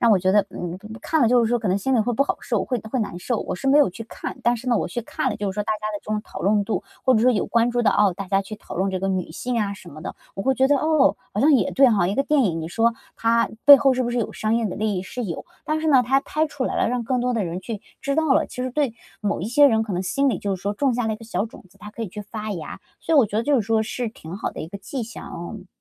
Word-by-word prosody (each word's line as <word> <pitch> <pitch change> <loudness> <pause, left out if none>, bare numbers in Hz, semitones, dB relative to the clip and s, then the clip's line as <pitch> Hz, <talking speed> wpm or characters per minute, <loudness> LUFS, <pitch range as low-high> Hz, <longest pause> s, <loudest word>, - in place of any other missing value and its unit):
让 235 - +4
我 200 - +5
觉 185 +1 +2
得， 205 -1 +4
嗯， 175 0 -5 0.2
看 320 -2 +1
了 230 - +5
就 245 -1 +4
是 - - 0
说 240 - +2
可 215 - -1
能 190 +2 +2
心 265 +6 0
里 235 - +4
会 240 +3 0
不 275 +5 +2
好 - - -1
受， - - -1
会 255 - -1
会 260 - 0
难 210 -6 -2
受。 240 +4 -1
我 - - -3
是 270 - -2
没 285 +2 +6
有 290 - +5
去 205 +5 -8
看， - - -7
但 240 0 +3
是 250 +3 -6
呢， 235 - +3
我 - - -1
去 240 - -3
看 - - -2
了 210 - -4
就 200 -3 -2
是 - - -15
说 210 - -1
大 215 - -1
家 - - -6 0.2
的 - - -2
这 - - -9
种 215 0 0
讨 - - -9
论 205 +1 +2
度， 220 - -2 0.2
或 260 -1 +5
者 215 - +3
说 255 - +6
有 220 - 0
关 235 +1 +2
注 245 0 0
到， 205 -3 +4
哦， 205 -3 +3
大 195 -1 -5
家 195 +1 +1
去 215 +2 -8
讨 - - -10
论 190 +2 0
这 185 - -2
个 195 - -2
女 185 -3 -2
性 245 +6 -2
啊 200 -1 -1
什 185 -2 -13
么 155 - -11
的， 160 - -6 0.2
我 195 - -4
会 265 +3 +2
觉 265 0 +3
得， 285 +1 +4
哦， 305 -7 +3 0.2
好 210 - 0
像 300 +2 +5
也 265 - +3
对 270 -1 +6
哈， 195 -5 +2
一 200 - -1
个 275 - +2
电 295 0 +2
影 170 -8 0
你 160 - -5
说 230 +5 +2 0.2
它 230 0 +2 0.2
背 285 -1 +12
后 270 0 +3
是 255 0 0
不 240 - -1
是 245 - -1
有 225 - -2
商 215 +1 -1
业 230 -1 +1
的 190 - -5
利 215 0 0
益？ 180 - -2
是 245 +5 -5
有。 170 -5 -5 0.2
但 310 0 -1
是 315 - 0
呢， 265 -4 +6
它 270 +3 +2
拍 310 +3 -1
出 280 -3 -4
来 - - -2
了， - - +2
让 245 0 -1
更 250 +2 0
多 250 0 0
的 220 - 0
人 175 +1 -4
去 210 +1 -6 0.2
知 280 -2 -1
道 315 -3 +3
了， - - +3
其 250 - -6
实 255 - -2
对 270 -3 0 0.3
某 205 -5 -1
一 195 - -3
些 285 +5 +6
人 220 -5 +3
可 220 -2 -4
能 180 +1 -1
心 275 +9 +1
里 255 - 0
就 195 -2 -2
是 - - -16
说 200 - -1
种 260 +4 +1
下 240 -1 -1
了 220 - 0
一 - - -4
个 225 - -13
小 200 -3 -1
种 220 - -12
子， 195 - -24
它 210 +2 -10
可 230 - -6
以 210 - -4
去 210 +3 -7
发 215 +1 -6
芽。 165 -5 -7 0.2
所 325 - 0
以 - - +7
我 245 - +6
觉 210 - -4
得 225 - +2
就 290 +3 +2
是 - - -1
说 220 +1 +1
是 235 +1 -3
挺 170 -5 -10
好 - - -3
的 - - -8
一 160 - -6
个 200 - -8
迹 255 +4 -5
象， 230 - -8
嗯。 185 +3 -8
225 Hz, 370 characters per minute, -23 LUFS, 200-255 Hz, 0.3 s, 背